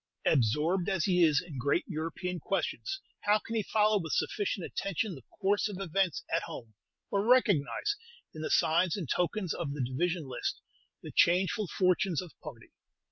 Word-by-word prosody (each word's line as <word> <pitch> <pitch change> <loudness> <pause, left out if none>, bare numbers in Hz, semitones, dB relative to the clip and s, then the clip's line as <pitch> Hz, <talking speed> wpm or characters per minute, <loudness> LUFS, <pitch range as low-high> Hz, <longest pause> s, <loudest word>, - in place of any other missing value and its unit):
Absorbed 155 - +2
as 190 -4 +1
he 180 -2 +3
is 150 -4 +4
in 150 -7 -7
great 145 +7 +1
European 170 +2 -3
questions, - - -2 0.2
how 210 +1 +5
can 225 - -8
he 220 - +2
follow 210 0 +3
with 160 -4 -5
sufficient 200 -2 -1
attention 195 +1 -2
the 135 - -10 0.2
course 205 +2 +2
of 195 -2 -6
events 190 -2 0
at 165 - +2
home, 115 -9 -8 0.4
or 200 0 +1
recognize, 240 - +3 0.4
in 155 - -7
the 155 - -2
signs 170 +3 +3
and 175 -7 -4
tokens 180 - 0
of 150 -5 -3
the 145 -3 -2
division 165 +7 -1
list, 125 - -3 0.4
the - - -7
changeful 190 +4 +3
fortunes 185 -1 +1
of 180 -3 -6
party? 120 -7 -10
180 Hz, 170 wpm, -30 LUFS, 155-195 Hz, 0.4 s, how